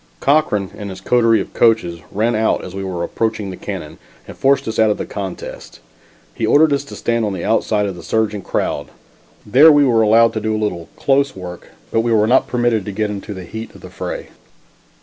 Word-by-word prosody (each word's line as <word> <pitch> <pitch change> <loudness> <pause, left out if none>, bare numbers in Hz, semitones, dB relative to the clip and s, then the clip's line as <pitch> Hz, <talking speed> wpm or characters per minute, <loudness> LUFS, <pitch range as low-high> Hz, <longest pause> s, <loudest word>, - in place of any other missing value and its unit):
Cochran 135 -10 +1
and 105 -1 -7
his 95 -1 -8
coterie 115 +2 +3
of - - -8
coachers 100 -8 +2
ran 110 +4 +1
out 110 +1 +1
as 90 - -8
we 95 0 -5
were 90 -3 -3
approaching 110 -2 -2
the - - -7
cannon - - -7 0.3
and - - -9
forced 135 +1 +2
us 110 - -3
out 110 -1 +5
of 105 - 0
the - - -4
contest. 95 -3 -7 0.5
He - - -6
ordered 150 0 +4
us 140 - 0
to - - -10
stand 115 -1 -1
on 105 -2 -1
the 90 - -4
outside 105 -2 +1
of 100 -2 -4
the 85 - -10
surging 105 +1 -1
crowd. - - -2 0.6
There 140 +10 +7
we 145 -1 +5
were 115 -4 +3
allowed 115 +1 +5
to 110 - -3
do 110 0 -1
a 110 - -1
little 85 -5 -3
"close 140 0 +1
work," 90 -2 -9 0.2
but 115 - +2
we 115 +1 0
were 105 -2 +4
not 125 +4 +3
permitted 120 -4 +1
to 105 - -4
get 105 +1 -2
into 100 0 -6
the 95 - -7
heat 110 +4 -8
of - - -14
the - - -11
fray. - - -6
110 Hz, 225 wpm, -18 LUFS, 100-115 Hz, 0.6 s, There